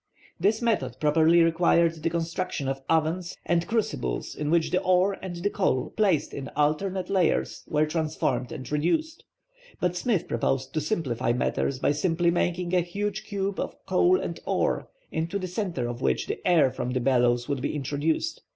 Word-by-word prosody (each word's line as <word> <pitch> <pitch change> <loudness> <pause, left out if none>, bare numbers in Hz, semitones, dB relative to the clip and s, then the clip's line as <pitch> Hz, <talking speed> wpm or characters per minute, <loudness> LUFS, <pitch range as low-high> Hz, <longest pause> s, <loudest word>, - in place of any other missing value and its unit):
This 215 +6 +2
method 230 -2 0
properly 160 +3 +4
required 165 0 +3
the 165 - +1
construction 165 -3 -2
of 135 0 -2
ovens 165 +3 0
and 170 0 +1
crucibles 130 - -2
in 150 0 -3
which 165 0 +2
the - - +2
ore 185 +2 +3
and 185 -2 -5
the 175 +4 -1
coal, 150 -9 0
placed 195 -8 +2
in 135 -1 -5
alternate 180 +6 0
layers, 185 -4 +1
were 150 0 +2
transformed 155 -6 -1
and 130 0 -7
reduced. 310 - 0 0.6
But 180 -1 0
Smith 195 -1 0
proposed 130 +3 -1
to 155 - 0
simplify 140 - -1
matters 130 +2 0
by 140 - +1
simply 170 +3 +1
making 175 +1 -1
a 180 - +4
huge 200 +4 -3
cube 200 -2 -2
of - - -3
coal 355 - +3
and - - -4
ore, - - 0 0.2
into 165 +4 -2
the 190 - -4
centre 180 - -2
of 120 +1 -5
which - - +1
the - - -4
air 160 -7 +5
from 125 -1 -4
the 130 - +1
bellows 120 -1 +2
would 140 -3 -2
be - - -2
introduced. 150 - -1
165 Hz, 175 wpm, -26 LUFS, 145-185 Hz, 0.6 s, air